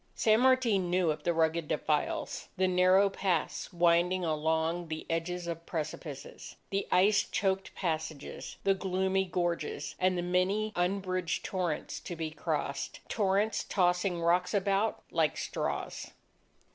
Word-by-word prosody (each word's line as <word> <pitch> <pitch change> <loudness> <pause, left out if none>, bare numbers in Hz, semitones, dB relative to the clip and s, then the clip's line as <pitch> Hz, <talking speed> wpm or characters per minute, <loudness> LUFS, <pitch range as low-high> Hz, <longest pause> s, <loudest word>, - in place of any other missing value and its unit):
San 220 0 +4
Martin 245 -8 +3
knew 180 -2 +2
of 150 0 -4
the 175 - +1
rugged 165 -1 +1
defiles, 150 0 -1
the 185 0 +3
narrow 185 +2 +5
paths 190 -4 -1
winding 175 +1 +3
along 160 +2 0
the 155 0 -5
edges 175 +2 -2
of 170 -1 -5
precipices, 155 -3 -6 0.2
the 195 0 -1
ice 195 +2 +5
choked 190 -1 -1
passages, 160 -4 -4
the 195 - +4
gloomy 190 0 0
gorges, 170 -5 -2
and 185 0 +2
the 175 - -1
many 190 +5 +1
unbridged 185 -1 -1
torrents 180 -5 -2
to 175 - -6
be 160 -1 -4
crossed, 150 -3 -3
torrents 205 0 +1
tossing 180 -1 +1
rocks 180 +4 +2
about 200 +2 +1
like - - +1
straws. - - -3
180 Hz, 135 wpm, -31 LUFS, 165-190 Hz, 0.2 s, narrow